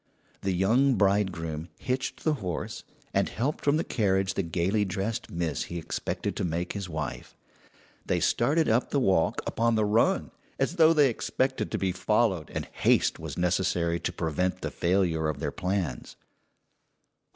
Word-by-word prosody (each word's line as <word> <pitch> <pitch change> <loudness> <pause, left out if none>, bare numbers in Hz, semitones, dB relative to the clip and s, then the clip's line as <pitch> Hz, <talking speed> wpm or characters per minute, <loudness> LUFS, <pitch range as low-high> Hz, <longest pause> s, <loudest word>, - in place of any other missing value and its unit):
The 95 - 0
young 120 +9 +3
bridegroom 90 -6 0
hitched 130 +1 -3
the 155 - +2
horse, 90 -4 -4 0.3
and - - +2
helped 135 +6 -2
from 145 +1 +3
the 160 - 0
carriage 95 -3 +1
the - - 0
gayly 90 +5 0
dressed 100 +4 -3
miss 85 -5 -2
he 85 - -6
expected 80 - -3
to - - -1
make 85 +1 -2
his 100 -3 -5
wife. 80 -4 -5 0.7
They - - 0
started 160 +3 +2
up 115 +3 +2
the 140 - +1
walk 95 -9 +2
upon 115 0 +1
the 110 -1 +2
run, 105 +3 +2 0.3
as 135 +7 -1
though 160 -1 +7
they 145 -5 +5
expected 130 +3 -1
to - - -2
be 95 -1 0
followed 95 -3 +1
and - - -4
haste - - +2
was - - -6
necessary 90 -1 +1
to - - -2
prevent 90 +2 -1
the - - -3
failure 85 -3 +1
of 75 - -3
their - - -2
plans. 90 -9 -3
95 Hz, 160 wpm, -28 LUFS, 85-115 Hz, 0.7 s, though